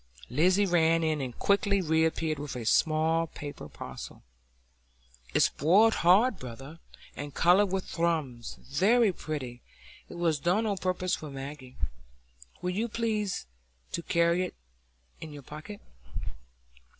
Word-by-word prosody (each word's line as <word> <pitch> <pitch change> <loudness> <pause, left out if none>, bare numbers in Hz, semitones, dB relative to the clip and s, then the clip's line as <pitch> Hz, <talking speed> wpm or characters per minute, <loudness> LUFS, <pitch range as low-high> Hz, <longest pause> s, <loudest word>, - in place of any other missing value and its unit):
Lizzy 180 +9 +4
ran 165 -2 +3
in, 155 -2 0
and 125 -3 -5
quickly 200 0 +2
reappeared 160 -2 +1
with 145 -2 -5
a 120 -2 -5
small 160 +5 +3
paper 145 -2 -8
parcel. - - -9 1.1
"It's - - +5
boiled 200 +10 +4
hard, 200 +7 +5
brother, 135 +6 -9 0.4
and 145 -1 -7
coloured 185 +4 +5
with 190 -1 -1
thrums, 155 -9 -2
very 200 - +3
pretty; 130 -8 -5 0.5
it - - -9
was 165 -3 +1
done 180 +8 +1
o' 205 -2 0
purpose 185 -1 -1
for 155 - -3
Maggie. 135 -1 -8 0.9
Will 180 - 0
you 215 +6 -1
please 215 - -1 0.5
to 170 - -2
carry 170 +1 +2
it 180 - -5 0.6
in 160 - -8
your 145 -1 -10
pocket?" 155 - -9
165 Hz, 130 wpm, -29 LUFS, 145-190 Hz, 1.1 s, It's